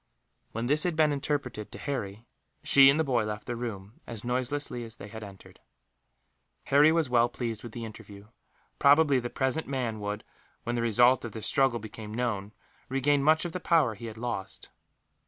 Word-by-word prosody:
When 115 +1 -3
this 150 +4 +2
had 175 -1 -1
been 155 -1 +3
interpreted 140 -6 -3
to - - -9
Harry, 110 -6 -5 0.4
she 135 -1 +7
and 140 +3 +3
the - - +3
boy 125 -6 +1
left 105 -1 -5
the 120 - -4
room, 110 -4 -7
as 115 -3 -4
noiselessly 125 +1 -2
as 115 0 -9
they 100 - -10
had 110 +1 -8
entered. 100 -2 -13 1.0
Harry 145 +3 +5
was 165 -2 +1
well 120 -1 +3
pleased 115 -3 -4
with 120 - -9
the 115 -1 -5
interview. 105 -1 -12 0.5
Probably 145 -1 +5
the 120 0 -4
present 130 +5 -1
man 125 -5 -2
would, 105 +1 -4 0.4
when 120 - -2
the 120 - -1
result 120 +3 +4
of 115 -3 -6
this 110 -1 -6
struggle 135 -3 +2
became 110 -1 -9
known, 105 -5 -2 0.4
regain 140 +2 +2
much 155 +4 +3
of 175 - -3
the 180 - -4
power 160 -10 +2
he 115 +2 -8
had 110 0 -8
lost. 115 -5 -5
120 Hz, 190 wpm, -28 LUFS, 110-140 Hz, 1.0 s, she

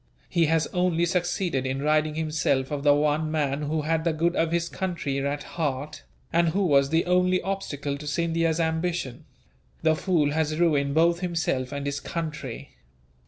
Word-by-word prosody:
He 170 -3 +2
has 160 0 +2
only 180 -2 +2
succeeded 175 -5 -1
in 130 +1 -2
ridding 155 0 +2
himself 155 -4 0
of 145 -1 -2
the 145 0 +5
one 150 +1 +1
man 150 -2 -1
who 150 +1 -1
had 160 +1 0
the 165 -1 +1
good 170 +3 0
of 165 0 +1
his 170 0 0
country 170 -7 -3
at 145 +1 -2
heart, 145 -3 -3 0.3
and 170 0 +3
who 195 +4 +1
was 140 -4 +4
the 165 +2 +2
only 180 +1 +3
obstacle 145 -7 -3
to 150 - -8
Scindia's 165 +1 0
ambition. 160 -5 -2 0.6
The 160 - +4
fool 155 -4 +1
has 155 0 0
ruined 145 -4 +2
both 170 +1 +4
himself 160 -8 -1
and 140 0 -4
his 140 0 -2
country. 155 -7 -6
160 Hz, 170 wpm, -26 LUFS, 145-170 Hz, 0.6 s, the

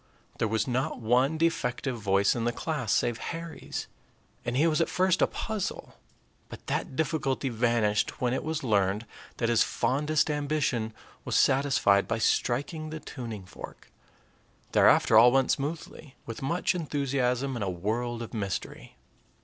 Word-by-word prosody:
There 115 - +2
was 110 +2 0
not 130 +1 -1
one 125 +7 +2
defective 135 -5 0
voice 100 -2 +2
in 115 -1 -2
the 120 - +2
class 125 -3 -3
save 120 -2 +1
Harry's, 165 -1 -5 0.6
and 120 +1 -2
he 150 - +4
was 165 0 +2
at - - +1
first 185 -1 +2
a - - +5
puzzle; 215 -4 -4 0.6
but - - -11
that - - -2
difficulty 145 -3 -1
vanished 115 -3 +1
when 125 -1 +1
it 130 - -2
was 160 -1 -3
learned 105 -2 +1 0.3
that 115 - 0
his 115 -1 +3
fondest 150 +6 +1
ambition 145 -6 -1 0.3
was - - -2
satisfied 130 -7 +3
by 115 - -1
striking 145 +7 0
the 155 0 -6
tuning 115 -10 -7
fork. 95 - -11 0.8
Thereafter 110 - +6
all 120 +2 +7
went 135 0 +3
smoothly, 145 -1 -4
with 115 - -7
much 170 +7 0
enthusiasm 140 -5 -1
and 115 - -2
a 95 - -1
world 115 +6 -2
of 115 - -9
mystery. 100 -4 -5
125 Hz, 150 wpm, -28 LUFS, 115-150 Hz, 0.8 s, all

